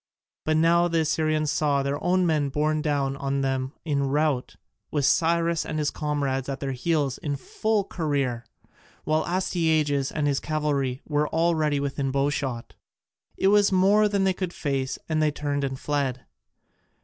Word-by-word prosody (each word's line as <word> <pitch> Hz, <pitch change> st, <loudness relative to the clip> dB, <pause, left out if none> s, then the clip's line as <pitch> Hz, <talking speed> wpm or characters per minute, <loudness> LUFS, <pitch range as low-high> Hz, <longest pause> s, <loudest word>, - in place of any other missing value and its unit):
But 155 Hz, 0 st, +2 dB
now 170 Hz, +2 st, +4 dB
the 165 Hz, -1 st, +1 dB
Assyrians 155 Hz, -1 st, 0 dB
saw 145 Hz, -2 st, +1 dB
their 140 Hz, +1 st, -2 dB
own 185 Hz, 0 st, +2 dB
men 150 Hz, -4 st, +1 dB
borne 150 Hz, +2 st, 0 dB
down 140 Hz, -3 st, 0 dB
on 140 Hz, 0 st, -1 dB
them 135 Hz, 0 st, -1 dB
in 145 Hz, -3 st, 0 dB
rout, 145 Hz, -2 st, 0 dB, 0.3 s
with 145 Hz, -3 st, 0 dB
Cyrus 170 Hz, +3 st, +2 dB
and -, -, -4 dB
his 150 Hz, -2 st, 0 dB
comrades 140 Hz, -3 st, -2 dB
at 135 Hz, 0 st, -3 dB
their 135 Hz, -1 st, -3 dB
heels 140 Hz, 0 st, -1 dB
in 145 Hz, -2 st, -2 dB
full 215 Hz, +9 st, -1 dB
career, 140 Hz, -10 st, -2 dB, 0.6 s
while 155 Hz, +1 st, +1 dB
Astyages 160 Hz, -6 st, +1 dB
and 150 Hz, -1 st, -1 dB
his 140 Hz, -1 st, +1 dB
cavalry 145 Hz, -4 st, -1 dB
were 150 Hz, 0 st, +1 dB
already 160 Hz, -3 st, +1 dB
within 140 Hz, -1 st, -2 dB
bowshot. 135 Hz, -3 st, -2 dB, 0.6 s
It 190 Hz, -, +3 dB
was 205 Hz, 0 st, +4 dB
more 200 Hz, +3 st, +4 dB
than 200 Hz, -1 st, +1 dB
they 190 Hz, -1 st, +2 dB
could 185 Hz, -1 st, -4 dB
face, 135 Hz, -3 st, -2 dB
and 155 Hz, -1 st, 0 dB
they 155 Hz, -, +3 dB
turned 145 Hz, -1 st, -2 dB
and 135 Hz, -1 st, -3 dB
fled. 135 Hz, -2 st, -2 dB
150 Hz, 160 wpm, -25 LUFS, 140-160 Hz, 0.6 s, now